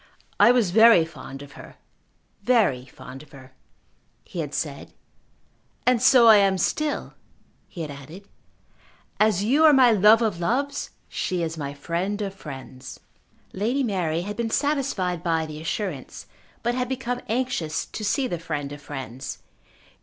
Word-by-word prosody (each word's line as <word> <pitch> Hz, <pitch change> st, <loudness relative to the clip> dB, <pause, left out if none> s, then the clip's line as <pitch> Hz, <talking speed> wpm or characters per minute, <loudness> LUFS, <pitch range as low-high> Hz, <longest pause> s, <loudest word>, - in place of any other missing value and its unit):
"I 235 Hz, -, +7 dB
was 235 Hz, -8 st, +2 dB
very 225 Hz, -4 st, +7 dB
fond 135 Hz, -3 st, -10 dB
of 140 Hz, -, -13 dB
her; -, -, -13 dB, 0.7 s
very 200 Hz, -, +2 dB
fond 130 Hz, +1 st, -11 dB
of 150 Hz, -2 st, -18 dB
her," 135 Hz, -1 st, -14 dB, 0.7 s
he 175 Hz, -, -7 dB
had 150 Hz, -3 st, -3 dB
said. 145 Hz, -2 st, -5 dB, 0.9 s
"And 250 Hz, -2 st, +3 dB
so 255 Hz, -2 st, +6 dB
I 220 Hz, -2 st, +9 dB
am 195 Hz, -1 st, +3 dB
still," 300 Hz, +9 st, -1 dB, 0.5 s
he 175 Hz, -, -8 dB
had 150 Hz, -, -6 dB
added. 155 Hz, +8 st, -11 dB, 0.9 s
"As 210 Hz, -3 st, +3 dB
you 275 Hz, +9 st, +3 dB
are 310 Hz, -2 st, +8 dB
my 255 Hz, -3 st, +6 dB
love 215 Hz, +2 st, +5 dB
of 205 Hz, -6 st, -1 dB
loves, 275 Hz, +10 st, -1 dB, 0.2 s
she 180 Hz, -2 st, -2 dB
is 165 Hz, 0 st, -3 dB
my 145 Hz, -2 st, -5 dB
friend 175 Hz, +7 st, -3 dB
of 195 Hz, -1 st, -4 dB
friends." 135 Hz, -7 st, -10 dB, 0.5 s
Lady 235 Hz, +8 st, 0 dB
Mary 175 Hz, -7 st, -1 dB
had 205 Hz, +3 st, -5 dB
been 235 Hz, -1 st, -1 dB
satisfied 255 Hz, -, -1 dB
by 165 Hz, -2 st, 0 dB
the 155 Hz, 0 st, -8 dB
assurance, 165 Hz, -, -5 dB, 0.4 s
but 240 Hz, +1 st, +1 dB
had 250 Hz, 0 st, -2 dB
become 250 Hz, -1 st, -3 dB
anxious 225 Hz, -10 st, -1 dB
to 215 Hz, -, -8 dB
see 265 Hz, +6 st, 0 dB
the 175 Hz, -9 st, -3 dB
friend 150 Hz, -4 st, -4 dB
of 145 Hz, 0 st, -9 dB
friends. 135 Hz, -3 st, -7 dB
190 Hz, 155 wpm, -24 LUFS, 150-235 Hz, 0.9 s, I